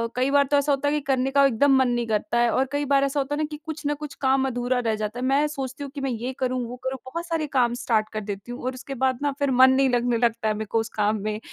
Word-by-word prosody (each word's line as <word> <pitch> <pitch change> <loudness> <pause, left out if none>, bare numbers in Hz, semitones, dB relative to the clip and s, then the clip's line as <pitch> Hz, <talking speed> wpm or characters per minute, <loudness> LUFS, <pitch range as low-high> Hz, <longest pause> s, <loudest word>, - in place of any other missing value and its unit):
कई 255 +2 +1
बार 285 0 +5
तो 290 - +5
ऐसा 285 +1 +1
होता 280 +1 0
है - - 0
कि 300 - +1
करने 265 0 +1
का 280 0 +5
एकदम 270 +2 +4
मन 260 -1 +3
नहीं 240 -1 -1
करता 215 +1 -1
है 240 0 +3
और 260 - +2
कई 290 0 -1
बार 275 0 +3
ऐसा 275 +1 0
होता 280 +1 -1
है 300 - -2
ना - - +1
कि 300 - -5
कुछ 315 -1 -6
न 295 - +1
कुछ 300 -2 -7
काम 265 0 +2
अधूरा 245 0 -1
रह 225 -3 0
जाता 215 +2 -4
है। 255 - -2
मैं 275 +3 +3
सोचती 275 -1 -5
हूँ 280 - -7
कि 280 - -4
मैं 270 -1 -1
ये 240 +3 -4
करूँ, 255 -1 0
वो 245 - -7
करूँ 260 0 -3
बहुत 335 +6 -5
सारे 325 -2 -1
काम 240 -2 +3
स्टार्ट 215 -2 +1
कर 215 - -3
देती 205 +2 -6
हूँ 245 - -7
और 255 - -1
उसके 275 +2 -8
बाद 260 -2 0
ना 290 0 +1
फिर 280 -1 +1
मन 260 +1 +6
नहीं 270 0 +3
लगने 245 -1 +1
लगता 230 -1 0
है 215 - +2
मेरे 215 +1 -4
को 225 - +2
उस 225 0 -3
काम 210 0 +1
में 215 0 -2
260 Hz, 320 wpm, -24 LUFS, 235-280 Hz, -, मन